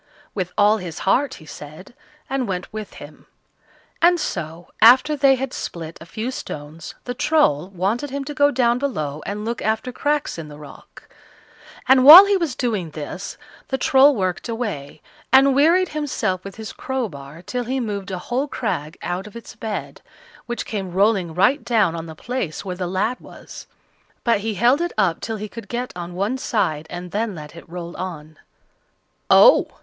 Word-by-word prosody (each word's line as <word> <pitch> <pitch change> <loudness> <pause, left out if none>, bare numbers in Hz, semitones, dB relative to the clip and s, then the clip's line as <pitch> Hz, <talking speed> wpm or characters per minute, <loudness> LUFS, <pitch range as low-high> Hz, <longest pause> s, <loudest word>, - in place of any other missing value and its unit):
With 185 -3 -3
all 210 +1 +5
his 175 -5 -7
heart, 265 +8 +2
he 155 - -14
said, 155 +7 -11 0.3
and 265 -2 -2
went 180 +1 -4
with 215 -1 -7
him; - - -13 0.7
and 345 +1 +5
so, 170 - -5
after 255 +6 +7
they 275 -1 +4
had 265 0 -4
split 165 -1 -6
a 165 - -11
few 220 +8 -4
stones, 155 - -8
the 245 - -4
Troll 245 - +2
wanted 200 +9 -2
him 280 +1 -4
to 295 +2 -6
go 285 -1 +4
down 245 -3 +2
below 155 - -3
and 210 +2 -4
look 235 +1 -3
after 220 +4 -1
cracks 290 - -1
in 160 - -7
the 145 -1 -11
rock; 150 -2 -14 0.8
and 260 0 +6
while 330 +8 +12
he 400 0 +2
was 335 -9 -1
doing 215 -10 -2
this 155 +5 -7 0.3
the 265 - -1
Troll 270 +2 +5
worked 185 +2 -2
away, 210 - -5 0.3
and 270 +1 +6
wearied 335 +7 +4
himself 270 -11 -2
with 195 -1 -9
his 220 -1 -8
crowbar 170 - -5
till 245 +6 -3
he 260 +3 -2
moved 205 -5 -4
a 190 - -3
whole 245 +10 -2
crag 160 - -3
out 180 +3 -3
of 210 - -14
its 235 - -10
bed, 220 -2 -5 0.5
which 240 0 -4
came 195 -5 -5
rolling 190 -4 +2
right 250 +8 +3
down 220 -7 +2
on 165 0 -6
the 160 - -9
place 205 -4 -4
where 185 -2 -4
the 180 0 -3
lad 200 +7 -1
was; - - -12 0.6
but 235 -4 +2
he 215 +1 -3
held 245 - +3
it 345 - -2
up 185 -6 +1
till 225 -1 -4
he 215 +1 -5
could 225 0 -10
get 245 +1 -4
on 175 0 -7
one 205 +8 -1
side, 160 - -1
and 180 0 -7
then 210 0 -2
let 150 -1 -10
it 170 - -13
roll 170 0 -7
on. 155 -4 -7 0.9
"Oh!" - - +7
210 Hz, 185 wpm, -21 LUFS, 175-255 Hz, 0.9 s, while